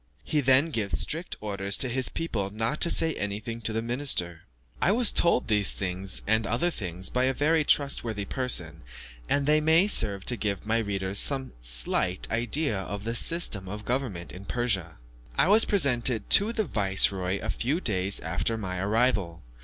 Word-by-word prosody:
He 150 - 0
then 135 +4 +3
gives 105 -7 -2
strict 165 +4 -4
orders 100 -1 -1
to 130 - +4
his 130 +1 0
people 110 -12 -3
not 115 +7 -3
to 170 - +5
say 160 -1 +3
anything 105 +2 -5
of - - -11
it - - -18
to 110 - +1
the 110 +1 -2
minister. 115 - 0 0.4
I 185 - +3
was 235 +1 +5
told 170 -7 +2
these 105 -3 +2 0.5
and 110 0 0
other 125 - 0
things 95 - -3
by 125 +1 +1
a 130 0 0
very 155 +3 +1
trustworthy 120 -8 0
person, 90 - -3 0.5
and 140 -1 +1
they 155 +1 +3
may 160 +4 +4
serve 105 - +1
to 125 - +2
give 100 -3 -3
my 115 +2 +1
readers 100 -2 -1
some 135 -2 +3
slight - - 0
idea 120 +1 0
of 100 +1 -6
the 115 +1 -3
system 120 - +2
of 105 +2 -8
government 120 -9 -3
in 95 +2 -11
Persia. 100 -9 -2 0.4
I - - +3
was 215 +3 +5
presented 125 - 0
to 205 +3 +5
the 220 -2 -2
viceroy 95 - 0
a - - -4
few 140 +8 -2
days 100 - +2
after 90 +8 -2
my 90 -4 -5
arrival. 100 - 0
115 Hz, 180 wpm, -26 LUFS, 100-140 Hz, 0.5 s, to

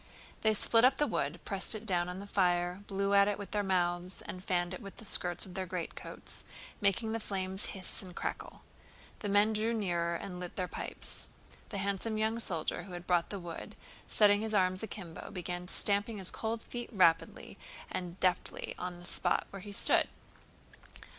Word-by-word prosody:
They 220 -1 +4
split 230 +3 +5
up 260 +1 +6
the 295 - +3
wood, 170 - -1
pressed 195 +2 -2
it 215 +1 -6
down 180 -4 +2
on 180 +1 -5
the 200 - -6
fire, 180 -2 +2
blew 195 0 +1
at 200 0 +7
it 205 - +1
with 205 - -7
their 210 - +2
mouths, 180 -1 0
and 185 0 -7
fanned 175 -1 +1
it 185 - -6
with 195 - -8
the 225 - -9
skirts 175 -3 +2
of 185 - -9
their 190 0 -3
greatcoats, 180 -1 -5 0.4
making 205 +3 +2
the 225 - 0
flames 190 -2 -1
hiss 185 - -4
and 180 -2 -10
crackle. - - -4 0.6
The 205 - -3
men 205 +2 +5
drew 220 +2 +1
nearer 170 -5 +1
and 180 0 -5
lit 180 -1 -5
their 185 -2 -1
pipes. - - -4 0.4
The - - -3
handsome 200 +3 0
young 220 +1 +1
soldier 170 -8 -1
who 190 - -9
had 175 0 -6
brought 175 -2 +3
the 200 - -3
wood, 170 -2 -7 0.3
setting 205 -1 +5
his 220 -1 -1
arms 185 -1 +3
akimbo, 190 -6 -6
began 180 -2 -4
stamping 205 +3 +1
his 190 -2 -2
cold 225 0 -2
feet 240 -1 -5
rapidly 170 -6 +3 0.3
and 180 0 -4
deftly 180 -1 +1
on 180 -1 -4
the 175 - -11
spot - - +1
where 195 - -7
he 205 +2 -7
stood. 200 - +4
190 Hz, 190 wpm, -33 LUFS, 180-210 Hz, 0.6 s, at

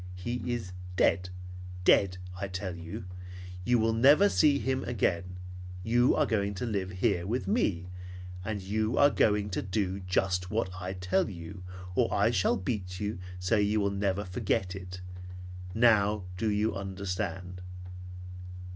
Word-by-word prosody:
He 120 +7 -3
is 110 -7 -3 0.2
dead. 90 0 +3 0.5
Dead, 90 -1 +5 0.2
I 100 +2 -3
tell 95 -1 -4
you! 85 +1 -7 0.6
You 120 +5 +3
will 115 0 +2
never 145 - +6
see 145 -6 +4
him 130 -1 -1
again. 90 -6 0 0.5
You 120 +4 +4
are - - +3
going 100 -2 0
to 125 - -3
live 100 -5 -1
here 90 -1 0
with 120 +5 -1
me, 100 - +1 0.6
and 100 -1 -3
you 110 +4 0
are 145 0 +6
going 105 -4 +2
to - - -1
do 95 -1 -1
just 90 -1 0
what 105 -3 0
I 90 +1 -4
tell 90 +2 +1
you 90 0 -8 0.3
or - - +2
I - - +3
shall - - +2
beat 90 -2 -3
you 105 -3 -2 0.2
so 90 +5 +1
you 105 +1 +2
will 100 -1 +1
never 100 0 0
forget 95 -1 -1
it. 90 -1 -7 0.7
Now 105 -3 +4
do 110 +4 0
you 105 +1 +1
understand?" 95 -1 -4
100 Hz, 150 wpm, -30 LUFS, 90-110 Hz, 0.7 s, never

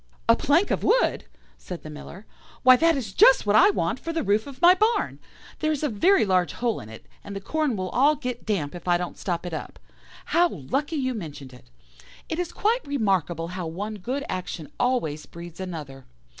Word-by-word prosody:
"'A - - +6
plank 330 +8 +2
of - - 0
wood!' - - +2 0.3
said 180 -2 -8
the 155 - -8
Miller; 170 +6 -10 0.4
'why, 255 0 +8
that 330 +3 +3
is 215 -8 -5
just 265 - +6
what 205 0 +2
I 220 - +7
want - - -1
for 330 - -4
the 325 -2 -2
roof 210 +5 +1
of 275 -2 -10
my 350 +1 +8
barn. 435 +5 0 0.4
There 310 0 +1
is 305 -1 -2
a 300 - +1
very 345 - +3
large 185 -2 +1
hole 240 -2 -1
in 105 - -10
it, 110 - -12 0.2
and 200 - -8
the - - -3
corn 300 +5 -1
will 185 -2 -3
all 285 +8 +3
get 250 -3 -5
damp 170 -10 -1
if 175 0 -10
I 175 -1 +4
don't 175 0 -5
stop 175 -2 -3
it 175 - -5
up. - - -6 0.5
How 345 +1 +3
lucky 275 - -3
you 260 -3 -1
mentioned 145 - -8
it! 125 - -17 0.6
It 320 - -3
is 355 -2 -2
quite 460 +4 0
remarkable 185 - 0
how 180 -1 -5
one 205 +6 -5
good 255 +8 -3
action 175 -4 -5
always 240 - -1
breeds 170 0 -11
another. 150 -8 -7
210 Hz, 210 wpm, -25 LUFS, 175-285 Hz, 0.6 s, why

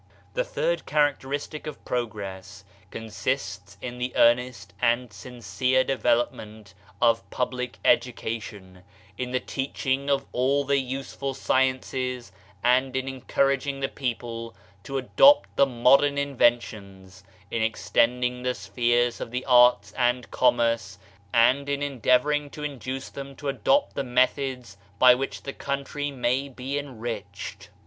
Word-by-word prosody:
The - - 0
third - - -2
characteristic 145 +1 -1
of 155 - -8
progress 100 -4 -5 0.2
consists 100 -2 -4
in 125 -1 -6
the 125 0 -3
earnest 120 -5 +2
and 120 -1 +1
sincere 125 +5 -1
development 110 -5 -1 0.3
of 115 -1 +2
public 125 0 -3
edu 125 -5 +3
cation, 100 -5 -7 0.4
in 125 -1 -2
the 130 0 0
teaching 135 +1 -2
of 135 -1 +1
all 135 +3 +1
the 140 0 +2
useful 135 +1 -4
sciences 130 -3 -1 0.3
and 130 +2 +3
in 130 0 -1
encouraging 135 +1 0
the 135 - 0
people 115 -4 -5 0.3
to 135 - -3
adopt 275 - +5
the 140 - +4
modern 135 +3 +4
inventions, 105 -9 -1 0.3
in 115 - -1
extending 125 +3 +1
the 125 0 -1
spheres 120 +4 0
of - - -4
the 125 +2 -4
arts 125 -5 +5
and 125 0 0
commerce, 115 -2 +1 0.3
and 130 +4 +3
in 140 0 -1
endeavoring 145 +2 +1
to 150 - -9
induce 135 -2 -5
them 140 0 -8
to 145 +1 -4
adopt 275 - +1
the - - -2
methods 125 -3 0 0.2
by 125 +3 +8
which 135 +2 -4
the 135 - -5
country 140 +1 -3
may 135 +1 -1
be 135 +2 -4
enriched. 105 - -7
125 Hz, 130 wpm, -26 LUFS, 115-135 Hz, 0.4 s, by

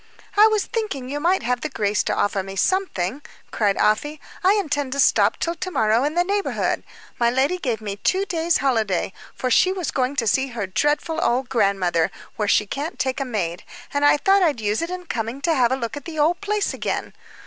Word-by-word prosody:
"I 420 +1 +7
was 430 -2 +1
thinking 410 - -3
you 290 +2 -3
might 355 +5 +1
have 245 0 -1
the 310 - -3
grace 210 -5 0
to - - 0
offer 200 -1 0
me 195 +1 -8
something," 275 - 0 0.3
cried 205 -3 +1
Afy. 295 +8 +1 0.2
"I 380 +2 +5
intend 290 -9 -1
to 280 - -4
stop - - +4
till 335 - -1
to 345 +2 -5
morrow 220 -6 +2
in 300 +3 -1
the 350 - +3
neighborhood. 400 +2 -1 0.4
My 235 -1 +4
lady 270 +9 +1
gave 240 - -2
me 205 -2 -5
two 380 - +1
days' 335 -2 +1
holiday 220 -9 0 0.2
for 255 - -2
she 370 - +4
was 365 -6 -3
going 260 +1 -1
to 240 - 0
see 265 +5 +2
her 235 -6 -4
dreadful 295 - 0
old 250 +2 +1
grandmother, 195 -8 +1 0.3
where 210 - -1
she 210 - +3
can't 285 - -5
take 260 +1 -1
a 275 - -1
maid 190 -7 -3 0.3
and 285 0 0
I 290 - +6
thought 390 +5 +3
I'd 310 -9 +2
use 210 0 0
it 335 - -3
in 365 0 -6
coming 230 -3 -3
to 325 +3 +2
have 250 -5 +3
a - - +3
look 230 -4 -4
at 290 - -8
the 330 -2 -7
old 325 +5 +2
place 415 0 -1
again. - - -3
270 Hz, 220 wpm, -22 LUFS, 220-335 Hz, 0.4 s, I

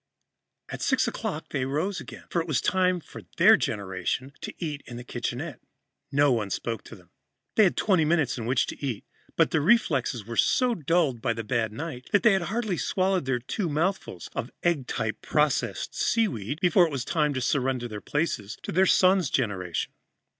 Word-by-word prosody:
At - - -6
six 260 -3 +2
o'clock, 195 -9 -4
they 140 - -2
arose 150 +9 -1
again, - - -10
for 170 - +1
it 165 - -6
was 150 -5 +1
time 185 -1 +2
for - - -11 0.2
their - - +8
generation 100 +7 -2
to - - -5
eat 155 -4 -3
breakfast - - -17
in 120 - -7
the 120 - -7
kitchenette. 125 +4 -4 0.5
No 145 0 +4
one 110 -5 0
spoke 115 +3 -3
to - - -10
them. 90 -4 -20 0.4
They 215 - +6
had 180 - +1
twenty 185 -6 +3
minutes 155 -4 +2
in 115 -2 -5
which 130 - +2
to - - -8
eat, 125 -7 -3 0.3
but - - +3
their 155 - +2
reflexes 140 - +2
were 115 +1 -6
so 250 -1 +3
dulled 160 - +1
by 115 -1 +1
the 115 0 -5
bad 110 -1 0
night 140 +1 -6
that 205 - +4
they 230 -3 +6
had 190 - +2
hardly 215 -4 -1
swallowed 180 -11 0
two 195 -6 -1
mouthfuls 155 - -2
of 120 - -3
egg 160 -8 +1
type 110 -2 -2
processed 150 -2 0
seaweed 150 - 0
before 180 0 +5
it - - -7
was 130 -3 -3
time 150 -3 +1
to - - 0
surrender 130 -1 0
their 105 -3 -7
places 145 -9 -2
to - - -4
their 190 +3 +4
son's 185 -5 +4
generation. 95 - -1
145 Hz, 195 wpm, -27 LUFS, 120-180 Hz, 0.5 s, their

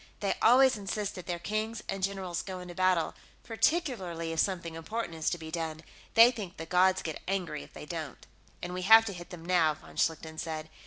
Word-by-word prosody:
They 200 - +1
always 255 +1 +6
insist 205 0 -3
that 180 - -9
their 175 -1 -2
kings 215 +4 -3
and 195 - -3
generals 185 -3 -2
go 185 -2 -6
into 180 -1 -8
battle, 185 -2 +2 0.3
particularly 220 - 0
if 165 - -3
something 170 -3 0
important 170 +3 -4
is 160 -1 -1
to 175 - -2
be 160 -1 -8
done. 160 -1 -4 0.3
They 230 +2 +9
think 205 -7 -7
the 160 - -6
gods 185 +2 +3
get 160 -2 -5
angry 185 - -2
if 70 - -14
they - - -9
don't." - - -6 0.4
"And 175 0 -4
we 180 - -3
have 225 +4 +8
to 200 - -4
hit 175 -1 -9
them 170 -2 -10
now," 170 -4 +3
von - - -15
Schlichten 160 0 -1
said. 155 -1 -5
180 Hz, 210 wpm, -30 LUFS, 165-205 Hz, 0.4 s, They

